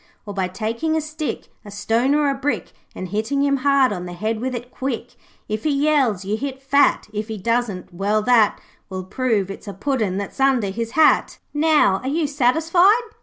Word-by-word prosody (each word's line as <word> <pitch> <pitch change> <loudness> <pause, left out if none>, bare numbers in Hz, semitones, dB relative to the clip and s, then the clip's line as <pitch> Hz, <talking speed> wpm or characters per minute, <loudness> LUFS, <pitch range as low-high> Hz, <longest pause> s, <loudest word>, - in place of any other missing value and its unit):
Or 205 - -6
by 190 -2 -1
taking 230 - -2
a - - +2
stick, 310 0 -5
A 210 - -11
stone 225 +7 +1
or 300 -1 +2
a 280 - +2
brick, 275 +2 -2 0.2
And 185 - -6
hitting 220 +8 -1
him 280 -1 +2
hard 275 -3 +3
on 180 -2 -5
the 175 - -7
head 215 +5 -2
with 255 0 -2
it 245 +1 -7
quick. 255 -2 -4 0.3
If 215 0 -3
he 310 - +1
yells, 275 -9 +1
you 210 +2 -1
hit 270 +1 -5
fat, 275 +1 +2
If 210 +1 -3
he 220 -1 -5
doesn't, 215 -4 -2
well 205 +4 0
that 230 -3 +4 0.3
Will 185 -1 -5
prove 205 -1 -1
it's 195 - -10
a 200 - -5
Puddin' 215 -4 -1
that's 200 +6 -6
under 265 -7 +2
his 230 +3 -4
hat.' 315 - +4 0.2
'Now 295 -10 +3
are 260 - -6
you 315 +2 0
satisfied?' 330 - +3
245 Hz, 200 wpm, -21 LUFS, 205-280 Hz, 0.3 s, that